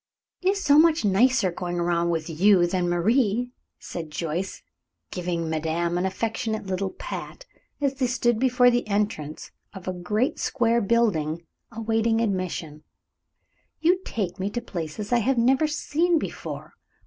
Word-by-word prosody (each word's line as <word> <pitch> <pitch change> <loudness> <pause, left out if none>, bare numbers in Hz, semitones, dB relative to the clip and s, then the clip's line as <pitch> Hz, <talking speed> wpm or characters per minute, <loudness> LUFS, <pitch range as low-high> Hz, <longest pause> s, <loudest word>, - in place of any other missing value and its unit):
"It 370 - +2
is 395 0 0
so 290 0 +6
much 320 -5 +4
nicer 205 0 +3
going 175 0 -4
around 170 0 +1
with 160 -2 -1
you 180 +2 +4
than 175 0 0
Marie," 225 +6 +1 0.3
said 165 -3 -7
Joyce, 165 +4 -4 0.5
giving 175 -2 -2
madame 160 +2 -1
an 180 +2 +1
affectionate 220 +2 -2
little 190 0 -2
pat, - - -7 0.3
as 280 -2 +1
they 265 -2 0
stood 240 -2 +1
before 250 -1 +4
the 240 -2 0
entrance 200 -8 -2 0.2
of 190 -1 -9
a 185 - -1
great 210 - -1
square 235 -3 +1
building, 170 -8 +1 0.3
awaiting 225 0 0
admission. 185 -8 -2 1.0
"You 355 +4 +3
take 190 - -3
me 190 +2 -1
to 240 - -3
places 175 +3 -5
that 240 - +5
I - - +3
have 255 +3 +1
never 265 +6 +3
seen 320 +3 +1
before. - - -6
205 Hz, 150 wpm, -25 LUFS, 175-245 Hz, 1.0 s, so